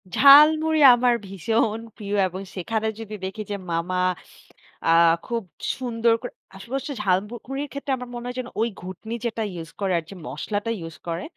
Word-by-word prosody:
ঝালমুড়ি 310 +3 +7 0.2
আমার 245 0 +3
ভীষণ 215 +4 0 0.2
প্রিয় 205 -2 -4
এবং 185 +2 -7
সেখানে 220 +4 -2
যদি 215 -1 -7
দেখি 205 +3 -5
যে - - -1 0.2
মামা 170 +2 -1 0.9
আ - - +3 0.4
খুব 235 -2 -2 0.3
সুন্দর 235 -2 +1
করে 245 - -6 0.2
আসপাশে 235 +7 -7
হচ্ছে 285 +1 -5
ঝালমুড়ির 235 +9 -1
ক্ষেত্রে 280 0 -4
আমার 250 -1 -8
মনে 240 - -6
হয় 250 - -5
যেন 250 - -4
ওই 230 - +2
ঘুঁটনি 190 +5 -7
যেটা 225 -1 -1 0.2
use 165 - -11
করে 190 -2 +1
আর 165 - -2
যে 195 - -9
মসলাটা 205 +10 -3
use 165 - -9
করে 170 +1 -3
225 Hz, 170 wpm, -24 LUFS, 190-245 Hz, 0.9 s, ঝালমুড়ি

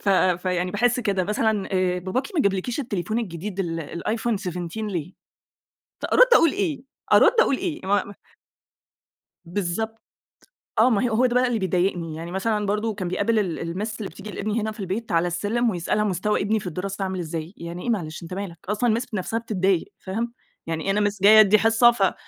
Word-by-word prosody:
ف - - -3
فيعني 180 -1 +2
باحس 240 +4 +1
كده 195 -5 0
مثلًا، 210 0 0
آآ 185 -1 +1
باباكِ 190 +9 -2
ما 310 - +3
جابلكيش 200 +7 0
التليفون 215 - -2
الجديد 195 -1 -4
ال 165 -1 -4
الiPhone 225 +1 0
17 180 +1 -5
ليه؟ 180 -3 -4 1.0
أرد - - +7
أقول 330 -8 +5
إيه؟ 335 -10 -2 0.3
أراد - - +7
أقول 275 - +3
إيه؟ 330 -4 -3
ما 205 +1 0 1.3
بالضبط 205 +5 -3 0.8
آه، 235 - +6
ما 220 -5 +2
هي 245 - +1
هو 225 +3 +2
ده 245 -1 +1
بقى 250 0 +4
اللي 235 -3 0
بيضايقني. 180 -3 0
يعني 165 +2 -6
مثلًا 210 +2 0
برضه 210 +2 0
كان 190 -3 -4
بيقابل 220 +5 +1
ال 185 -6 -2
الMiss 185 +7 -3
اللي 200 - -4
بتيجي 210 - -9
لإبني 215 +3 -2
هنا 220 +1 -2
في 215 - -13
البيت 195 +4 -4
على 170 +1 +2
السلّم، 215 +7 0
ويسألها 185 +3 0
مستوى 210 +1 0
ابني 215 +2 +1
في 190 - -7
الدراسة 190 +3 -4
عامل 190 -1 -3
إزاي. 165 +1 -5
يعني 170 +1 -7
إيه - - -3
معلش، 170 -7 -2
أنت 165 - -8
مالك 185 -3 -5
أصلًا؟ 220 +3 +1
الMiss 250 - -5
بنفسها 210 +3 -1
بتتضايق، 195 -5 0
فاهم؟ 230 +5 -3 0.3
يعني 160 -1 -2
إيه 195 - +2
أنا 205 0 +2
Miss 205 - -10
جايّة 215 +2 +8
أدّي 215 0 +6
حصّة، 225 +2 +5
ف 195 -5 +1
200 Hz, 190 wpm, -24 LUFS, 180-220 Hz, 1.3 s, جايّة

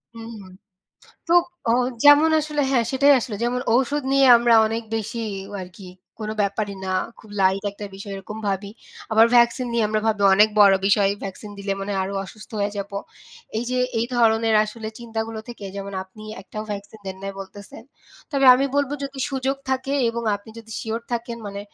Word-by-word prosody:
হুম, 225 0 -9
হুম। 185 -1 -13 0.8
তো, 335 - +1 0.4
অ - - +4 0.3
যেমন 290 +2 +7
আসলে 300 -1 -2
হ্যাঁ, 245 -4 +2
সেটাই 280 +2 +5
আসলে। 230 -3 -4
যেমন 245 +1 0
ঔষুধ 275 +4 +1
নিয়ে 275 0 +5
আমরা 235 0 +3
অনেক 225 +1 -2
বেশিই 225 0 -3 0.3
আরকি, 180 +1 -10 0.3
কোন 215 - -4
ব্যাপারই 200 0 -2
না, 190 - -3 0.3
খুব 215 - -16
লাইট 190 +1 +3
একটা 205 +1 -8
বিষয়, 200 +1 -8
এরকম 205 +3 -8
ভাবি। 200 +1 -2 0.4
আবার 220 +1 +7
ভ্যাকসিন 240 +1 +4
নিয়ে 235 -1 +2
আমরা 215 0 0
ভাবি, 215 -2 +1
অনেক 210 +2 +6
বড় 200 -1 +8
বিষয়। 200 -1 +3
ভ্যাকসিন 195 +2 -7
দিলে 200 0 -2
মনে 195 +1 -4
হয় 195 - 0
আরো 195 +1 -5
অসুস্থ 215 +3 -13
হয়ে 200 0 -1
যাবো। 200 0 -5 0.6
এই 235 - -2
যে 255 - 0 0.2
এই 230 - 0
ধরনের 225 -1 +3
আসলে 220 +1 -7
চিন্তাগুলো 225 -1 -5
থেকে, 235 -4 -9
যেমন 200 0 -6
আপনি 190 +3 -15 0.2
একটাও 215 +2 -7
ভ্যাকসিন 205 +1 -7
দেন 190 0 -5
নাই 195 0 -4
বলতেছেন। 200 +2 -11 0.5
তবে 275 -3 +1
আমি 265 +2 +1
বলব, 285 -1 +1
যদি 275 0 -7
সুযোগ 270 0 -1
থাকে 265 +1 -1 0.2
এবং 235 0 -3
আপনি 205 +2 -15
যদি 225 -1 -11
শিওর 225 +1 -3
থাকেন, 235 0 -3
মানে 200 0 -6
220 Hz, 185 wpm, -23 LUFS, 200-240 Hz, 0.8 s, বড়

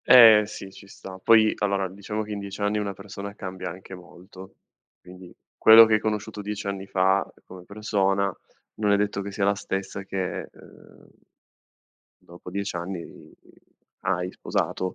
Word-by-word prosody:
Eh 115 -4 +9
sì, 105 -2 -9
ci 100 - -15
sta. 95 -1 -11
Poi 110 -2 +5
allora 100 -2 0
diciamo 100 +3 -5
che 105 - -9
in 105 - -4
10 100 0 -7
anni 105 +1 0
una 100 -1 -3
persona 100 +1 -9
cambia 95 -2 -6
anche 95 +2 -11
molto. 95 +1 -13 0.4
Quindi 90 0 -14 0.3
quello 110 +1 +9
che 110 -1 +3
hai - - +2
conosciuto 105 0 -3
10 105 +1 -5
anni 100 -1 -4
fa 95 +1 +2
uhm, - - -22
come 90 -1 -12
persona, 100 -2 0 0.4
non 105 -1 0
è 100 - +4
detto 100 -1 -1
che 100 +1 -6
sia 100 0 -1
la 100 - +3
stessa 95 -1 -5
che 95 -1 -4
uhm, - - -18 1.1
dopo 85 +1 -13
10 100 +2 -3
anni 85 0 -5 1.0
hai 90 -1 -1
sposato. 95 -1 -3
100 Hz, 165 wpm, -25 LUFS, 95-105 Hz, 1.1 s, Eh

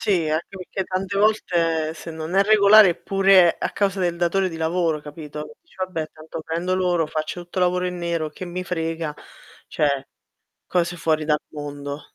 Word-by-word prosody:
Sì, 180 -7 +1
anche 155 +2 -1
perché 190 +1 -4
tante 190 +2 -2
volte 170 -7 +1
se 165 +1 -9
non 160 +3 -4
è 195 - +5
regolare, 210 -1 +7
è - - -1
pure 195 -3 +4
a - - -2
causa 200 -1 0
del 175 -2 0
datore 175 +2 +1
di 165 - -7
lavoro, 160 -1 0
capito? 150 +4 -8
Dice: 335 - -26
"Vabbè 165 -4 -4
tanto 160 +1 -8
prendo 170 +4 -2
loro, 175 -3 +1
faccio 155 +3 -4
tutto 175 +2 -7
lavoro 180 0 +2
in 180 0 -3
nero, 170 -2 -2
che 170 - -8
mi 180 +1 -4
frega" 165 -3 -3 0.5
cioè 140 -2 0 0.6
cose 175 0 0
fuori 155 -2 +1
dal 150 0 +2
mondo. 145 -1 -6
170 Hz, 180 wpm, -23 LUFS, 155-185 Hz, 0.6 s, regolare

